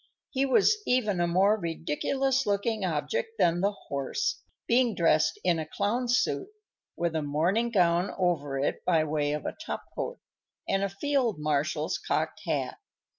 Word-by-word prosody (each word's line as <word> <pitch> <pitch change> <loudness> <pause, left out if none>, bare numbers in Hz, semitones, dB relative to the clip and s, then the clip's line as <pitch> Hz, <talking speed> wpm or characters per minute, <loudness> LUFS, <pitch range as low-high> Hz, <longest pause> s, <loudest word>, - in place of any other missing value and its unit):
He 275 0 +1
was 425 +9 +4
even 215 -7 +2
a 175 - +2
more 195 +5 +3
ridiculous 255 - -1
looking 205 +1 0
object 450 - -2
than 170 +1 +3
the 200 +2 +2
horse, 140 - -3 0.3
being 240 -2 +3
dressed 155 -2 +3
in 175 -2 +2
a 160 - -3
clown's 240 +8 0
suit, 380 - 0 0.5
with 170 -1 -1
a 160 - +1
morning 170 +11 +1
gown 180 -3 +3
over 155 -7 0
it 135 - -1
by 165 -3 +3
way 150 -1 0
of 150 - -4
a - - -2
top - - -4
coat, - - -4 0.5
and 195 0 +1
a 200 - 0
field 245 - 0
marshal's 150 0 -1
cocked - - -2
hat. - - -1
190 Hz, 160 wpm, -28 LUFS, 160-240 Hz, 0.5 s, was